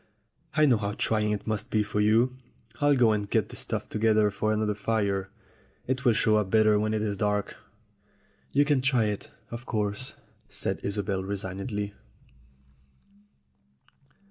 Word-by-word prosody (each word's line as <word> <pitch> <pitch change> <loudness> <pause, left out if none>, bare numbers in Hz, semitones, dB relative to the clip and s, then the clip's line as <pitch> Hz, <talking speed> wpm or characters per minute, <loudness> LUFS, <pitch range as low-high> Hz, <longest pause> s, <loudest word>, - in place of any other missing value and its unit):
"I 155 - +5
know 125 -5 +4
how 100 -1 -2
trying 105 0 0
it 105 -1 -3
must 110 -2 -2
be 105 -1 +2
for 105 0 -3
you. 115 +4 +3 0.4
I'll 145 -1 +4
go 120 -4 +4
and 105 -1 -1
get - - +1
the - - -9
stuff - - -4
together 110 -1 +2
for 105 +2 -1
another 110 -1 +1
fire; 100 -3 -1 0.6
it 130 0 -2
will 120 - +5
show 110 0 +3
up 105 -3 0
better 110 0 +4
when 110 +1 0
it 110 - -1
is 100 -3 -2
dark." 105 -1 -1 0.9
"You 145 +1 +4
can 145 -3 +2
try 130 -3 +3
it, 105 -1 -3 0.2
of 120 +2 -7
course," 105 +4 -2 0.3
said - - -2
Isobel 100 -1 -2
resignedly. 100 +2 -4
105 Hz, 155 wpm, -27 LUFS, 100-115 Hz, 0.9 s, I